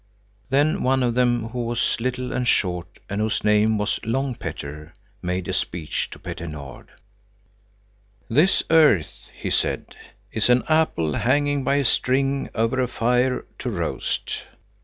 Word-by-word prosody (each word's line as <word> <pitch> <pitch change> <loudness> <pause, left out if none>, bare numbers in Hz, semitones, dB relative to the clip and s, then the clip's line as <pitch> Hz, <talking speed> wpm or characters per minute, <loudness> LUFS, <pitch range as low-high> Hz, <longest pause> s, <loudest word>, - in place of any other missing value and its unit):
Then 150 +7 +2
one 130 0 +2
of 120 -1 +1
them 120 -2 +1
who 120 +1 -3
was 115 0 0
little 125 +1 -2
and 125 0 -1
short, 90 -5 0
and 100 +1 -2
whose 110 0 0
name 105 +1 +3
was 105 0 -1
Long 130 +4 -1
Petter, 75 -5 -7 0.3
made 90 0 -2
a - - -2
speech 85 -3 -2
to - - -10
Petter 85 - -6
Nord. 70 -5 -9 1.4
"This 155 +11 +3
earth," 150 - +4
he - - -3
said, - - -1 0.4
is 110 +1 0
an 125 0 +5
apple 155 - +2
hanging 145 - +1
by 140 - +2
a 140 -1 +1
string 135 +2 +1
over 115 +4 +1
a 125 - +1
fire 125 +2 +1
to - - -3
roast. - - -3
120 Hz, 150 wpm, -23 LUFS, 105-130 Hz, 1.4 s, an